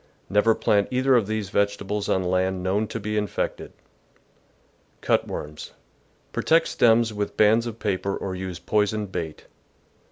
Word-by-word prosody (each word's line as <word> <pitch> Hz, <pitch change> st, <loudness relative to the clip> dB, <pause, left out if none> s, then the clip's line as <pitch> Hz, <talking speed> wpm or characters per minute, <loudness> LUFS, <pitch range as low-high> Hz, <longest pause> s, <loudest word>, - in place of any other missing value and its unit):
Never 105 Hz, +2 st, +4 dB
plant 100 Hz, -1 st, +2 dB
either 130 Hz, +1 st, +3 dB
of 115 Hz, -5 st, +2 dB
these 110 Hz, -3 st, -3 dB
vegetables 100 Hz, 0 st, -1 dB
on 95 Hz, -, +1 dB
land 90 Hz, 0 st, 0 dB
known 100 Hz, +4 st, 0 dB
to 115 Hz, -, -5 dB
be 105 Hz, 0 st, -3 dB
infected. 105 Hz, -1 st, -3 dB, 1.3 s
Cut -, -, +1 dB
worms. 75 Hz, 0 st, -7 dB, 0.3 s
— -, -, -38 dB
Protect 165 Hz, +1 st, +3 dB
stems 115 Hz, -1 st, +3 dB
with 105 Hz, -1 st, -4 dB
bands 110 Hz, +3 st, +4 dB
of 115 Hz, -1 st, -6 dB
paper 100 Hz, -2 st, -2 dB
or 95 Hz, -, -4 dB
use 95 Hz, -1 st, -5 dB
poisoned 105 Hz, -1 st, 0 dB
bait. 80 Hz, -4 st, -5 dB
105 Hz, 150 wpm, -24 LUFS, 95-110 Hz, 1.3 s, Never